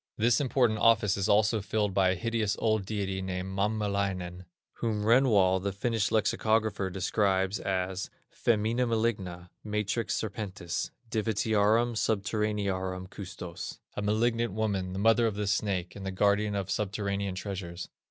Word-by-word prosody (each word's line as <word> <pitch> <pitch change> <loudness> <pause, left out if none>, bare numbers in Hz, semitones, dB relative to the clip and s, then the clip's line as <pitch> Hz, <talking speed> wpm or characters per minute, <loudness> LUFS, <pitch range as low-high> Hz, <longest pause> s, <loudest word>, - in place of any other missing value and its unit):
This 115 +3 +3
important 125 -5 +2
office 110 -3 +4
is 100 -2 -1
also 105 +1 +3
filled 105 0 -1
by 95 -1 +3
a 95 - +1
hideous 115 +1 -1
old 110 -3 +1
deity 95 -3 -2
named 95 0 -4
Mammelainen, 100 -3 -1 0.3
whom 110 -3 -1
Renwall, 105 -6 +4
the 100 +1 -1
Finnish 110 +1 0
lexicographer, 110 -2 +1
describes 95 +1 +1
as 95 0 -2 0.2
"femina 115 +2 +1
maligna, 100 -6 -1
matrix 105 +1 -1
serpentis, 95 -5 -4 0.2
divitiarum 110 +1 +2
subterranearum 100 -3 -1
custos," 90 -3 -7 0.2
a - - -2
malignant 115 +1 +1
woman, 100 -4 -1
the - - -4
mother 115 +3 +4
of 110 - -2
the 105 0 -2
snake, 100 -3 -1
and 100 - -8
the 95 - -3
guardian 100 +2 +2
of 95 -2 -2
subterranean 100 -1 -2
treasures. 95 -3 -5
100 Hz, 135 wpm, -29 LUFS, 95-110 Hz, 0.3 s, office